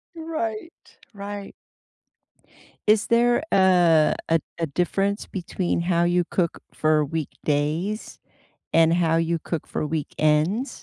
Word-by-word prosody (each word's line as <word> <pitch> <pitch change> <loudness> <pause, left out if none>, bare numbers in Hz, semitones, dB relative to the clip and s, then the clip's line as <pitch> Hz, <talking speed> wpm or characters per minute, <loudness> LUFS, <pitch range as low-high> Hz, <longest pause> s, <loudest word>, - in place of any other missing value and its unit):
Right, 320 -4 -4 0.4
right. 200 0 -7 1.3
Is 215 0 +4
there, 240 +2 +3
uh, 175 -5 +4
a 165 0 +3 0.2
a 165 - +1
difference 195 +7 -1
between 180 -1 -2
how 170 -1 +1
you 175 0 +2
cook 170 -3 -1
for 155 -1 +2
weekdays 155 +5 -3 0.5
and 165 0 +5
how 165 -2 +2
you 165 0 0
cook 160 0 -5
for - - -3
weekends? 155 - 0
175 Hz, 110 wpm, -24 LUFS, 160-205 Hz, 1.3 s, and